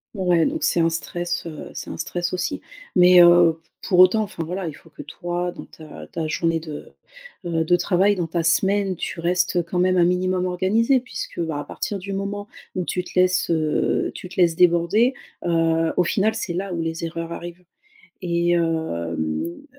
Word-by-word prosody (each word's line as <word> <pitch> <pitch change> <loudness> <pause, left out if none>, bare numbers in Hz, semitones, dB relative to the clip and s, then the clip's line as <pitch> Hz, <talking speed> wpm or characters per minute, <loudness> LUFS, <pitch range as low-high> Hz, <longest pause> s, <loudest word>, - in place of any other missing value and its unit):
Ouais 180 -4 +2
donc 315 +1 -2
c'est - - +2
un 165 0 +3
stress, 175 +1 -3
heu, 155 -2 -8
c'est - - -7
un - - -6
stress 175 +2 -3
aussi. 285 - -2 0.3
Mais, 180 0 +7
heu, 175 -2 +6 0.2
pour 180 - 0
autant 185 +4 +6
enfin 200 -5 -4
voilà, 180 +2 -4
il 155 - -5
faut 160 +2 -18
que - - -10
toi 175 0 -4
dans - - -10
ta 155 -1 -12
ta 165 -2 -4
journée 165 +1 0
de, 155 -2 -9 0.5
heu, 165 -1 0
de 175 - +4
travail, 190 +3 +2
dans 175 -3 -2
ta 165 +1 -2
semaine. 190 +4 +2
Tu 165 - -5
restes 180 0 +1
quand 175 +2 -3
même 185 0 +3
un 175 - +5
minimum 180 +1 +1
organisé, 210 +9 +2
puisque 245 -6 -7
bah, 160 -3 -2
à - - -4
partir 205 - -4
du 195 +2 -6
moment 200 +1 -4 0.3
où 180 - -2
tu 180 - -2
te 180 - -2
laisses, 185 0 +2
heu, 155 -2 0
tu 180 - -8
te 185 - -8
laisses 170 -2 +4
déborder 180 +9 +3 0.3
heu, 165 -1 +2
au 180 - +4
final, 210 +5 +1
c'est 195 -5 -3
là 190 +2 -3
où 170 - -2
les 165 0 -4
erreurs 165 0 -5
arrivent 175 +1 -8 0.6
et 170 -1 0
hem, 175 - +3
heu, 85 - -3
175 Hz, 195 wpm, -22 LUFS, 165-185 Hz, 0.6 s, Mais